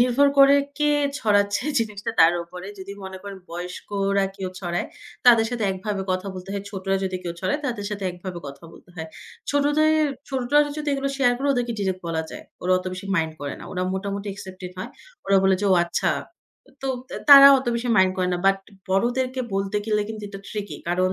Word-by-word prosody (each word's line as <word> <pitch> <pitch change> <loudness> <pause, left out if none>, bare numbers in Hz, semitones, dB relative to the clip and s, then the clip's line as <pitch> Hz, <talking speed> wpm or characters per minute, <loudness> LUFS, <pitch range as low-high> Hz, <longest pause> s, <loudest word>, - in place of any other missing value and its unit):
নির্ভর 255 +3 +4
করে 275 0 +8 0.2
কে 295 - +1 0.3
ছড়াচ্ছে 205 0 +2 0.2
জিনিসটা 210 -3 -3
তার 165 +1 +7
উপরে। 180 +2 -10
যদি 195 +1 -7
মনে 190 0 -7
করেন 200 -1 -8
বয়স্করা 195 +3 -2
কেউ 190 -1 -4
ছড়ায়, 175 -1 -2 0.4
তাদের 230 -2 +7
সাথে 240 -3 -2
একভাবে 195 +1 -3
কথা 185 +1 -1
বলতে 185 +1 -9
হয়, 200 -1 -3
ছোটরা 195 -1 -2
যদি 185 -1 -2
কেউ 170 -1 -4
ছড়ায় 295 +1 -1
তাদের 225 -5 -3
সাথে 205 -2 -4
একভাবে 180 0 -7
কথা 140 +3 -10
বলতে - - -17
হয়। 160 0 -5 0.4
ছোটদের 305 +2 +3 0.2
ছোটরা 290 +3 +2
যদি 300 - -3
এগুলো 275 0 -1
শেয়ার 245 -3 +3
করে 280 +2 -1
ওদেরকে 245 -2 -1
ডিরেক্ট 190 -2 -1
বলা 160 -1 -1
যায়। - - -9 0.2
ওরা 185 +1 +2
অত 185 - -8
বেশি 185 +2 -7
মাইন্ড 160 -1 0
করে 145 -1 -4
না। - - -9
ওরা 180 0 -2
মোটামুটি 200 +1 -4
accepted 185 -2 -9
হয়। - - -5 0.4
ওরা 195 - +4
বলে 190 0 +4
যে, - - -1
"ও - - +6
আচ্ছা।" 170 - 0 0.7
তো 270 - -2 0.2
অ্যা - - -5
তারা 275 0 +12
অত 260 - -7
বেশি 235 +1 -2
মাইন্ড 185 0 +5
করে 180 -1 0
না। 175 - 0
বাট 195 0 +4 0.3
বড়দেরকে 250 +6 0
বলতে 195 +1 -1
গেলে 210 -1 +1
কিন্তু 215 -1 -7
এটা 195 -1 -9
ট্রিকি, 205 -8 -5
কারণ 185 +1 +1
200 Hz, 200 wpm, -24 LUFS, 185-245 Hz, 0.7 s, তারা